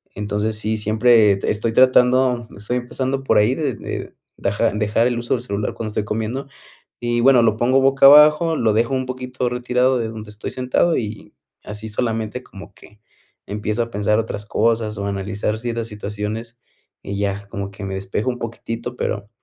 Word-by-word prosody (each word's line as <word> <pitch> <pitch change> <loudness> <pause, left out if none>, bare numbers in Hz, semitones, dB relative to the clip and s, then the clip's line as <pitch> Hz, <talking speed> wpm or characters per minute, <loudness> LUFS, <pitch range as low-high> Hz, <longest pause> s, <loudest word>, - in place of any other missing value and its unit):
Entonces 105 +1 -2
sí, 110 +1 -1
siempre 110 0 +4 0.2
estoy 110 +2 0
tratando. 125 -1 +4
Estoy 115 +5 -3
empezando 130 +2 -3
por - - +2
ahí 110 +5 +3
de 145 -7 -2
de - - -6 0.2
deja-dejar 105 +3 +1
el 120 -1 -1
uso 120 +2 0
del 120 - -4
celular 105 -2 -3
cuando 110 -1 -4
estoy 105 0 -2
comiendo. 115 +6 -3 0.5
Y 120 0 0
bueno, 125 -1 +6
lo 110 -1 +3
pongo 130 +3 +3
boca 135 +1 +5
abajo, 150 +3 +7
lo 110 -4 +2
dejo 115 +4 +1
un 130 0 -1
poquito 130 0 -3
retirado 125 +1 +1
de 115 -1 -2
donde 110 -1 -8
estoy 105 0 -7
sentado 130 +6 +1
y 105 -2 -5 0.3
así 105 +1 -7
solamente 115 +2 -2
como 100 0 -12
que 105 0 -18 0.5
empiezo 105 +3 -2
a 115 - -5
pensar 105 +1 +1
otras 105 -2 -3
cosas 110 -1 0
o 100 - -3
analizar 100 +2 -2
ciertas 115 -1 -3
situaciones 105 +2 -5 0.4
y 100 0 -5
ya 100 0 -2
como 100 0 -5
que 100 +1 -9
me 95 - -4
despejo 100 +5 -2
un 125 - -5
poquitito, 115 +1 -6
pero, 105 -3 -3
115 Hz, 175 wpm, -20 LUFS, 105-125 Hz, 0.5 s, abajo